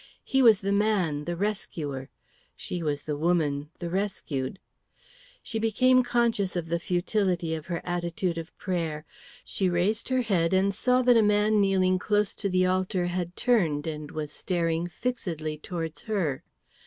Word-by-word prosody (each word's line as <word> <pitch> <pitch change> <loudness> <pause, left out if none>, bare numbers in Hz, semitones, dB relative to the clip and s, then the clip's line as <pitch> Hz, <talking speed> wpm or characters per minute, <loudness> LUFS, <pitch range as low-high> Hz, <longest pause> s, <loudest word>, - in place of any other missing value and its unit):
He 270 - +2
was 225 -6 +6
the 200 0 -1
man, 195 -8 +1
the 175 - -2
rescuer; 160 -9 -3 0.5
she 175 - -5
was 150 -3 -2
the 150 - -3
woman, 150 -3 0
the 175 - -5
rescued. 175 -7 -2 0.9
She 225 - -3
became 255 +4 +4
conscious 235 -6 +1
of 170 -2 -3
the 170 +1 0
futility 180 -1 0
of 160 -1 -5
her 175 -2 -3
attitude 175 0 -2
of 165 +1 -10
prayer. 165 -5 -3 0.4
She 190 -2 0
raised 185 +7 0
her 255 -1 +2
head 185 -5 +1
and 195 +1 +3
saw 250 +5 +2
that 245 -1 +6
a - - +6
man 210 0 +3
kneeling 185 -2 +3
close 210 0 +1
to 200 - -1
the 185 0 +3
altar 185 0 0
had 175 0 -3
turned 170 -13 +2
and 150 -2 -5
was 150 -1 -4
staring 170 0 -1
fixedly 165 -8 -4
towards 165 -1 -5
her. 185 - -1
180 Hz, 160 wpm, -27 LUFS, 165-210 Hz, 0.9 s, was